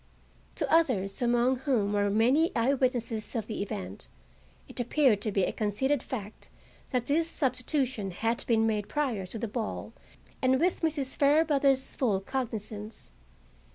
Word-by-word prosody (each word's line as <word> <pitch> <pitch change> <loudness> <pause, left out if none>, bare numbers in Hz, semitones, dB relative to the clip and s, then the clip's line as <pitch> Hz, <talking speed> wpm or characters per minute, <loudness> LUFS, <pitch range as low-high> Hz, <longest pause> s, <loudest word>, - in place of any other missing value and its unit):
To - - -1
others, 220 - +2
among 245 +2 +2
whom 240 -7 0
were 205 0 +2
many 250 - +3
eyewitnesses 245 -3 0
of 225 -3 -1
the 215 -2 -4
event, 95 - -6 0.6
it - - -8
appeared 245 -3 +3
to 215 - -1
be 195 -1 +1
a - - +1
conceded 235 +6 0
fact 215 -4 -7 0.4
that 250 -3 -1
this 320 +3 +1
substitution 255 -6 -1
had 225 +6 -1
been 225 -2 +3
made 210 -2 -1
prior 250 -11 -1
to 225 - -5
the 230 +1 -3
ball 220 0 -4 0.5
and 260 0 +3
with 350 +3 +1
Mrs. 295 -5 -1
Fairbrother's 280 -2 +3
full 215 -8 +1
cognizance. 215 - -5
240 Hz, 145 wpm, -29 LUFS, 210-270 Hz, 0.6 s, many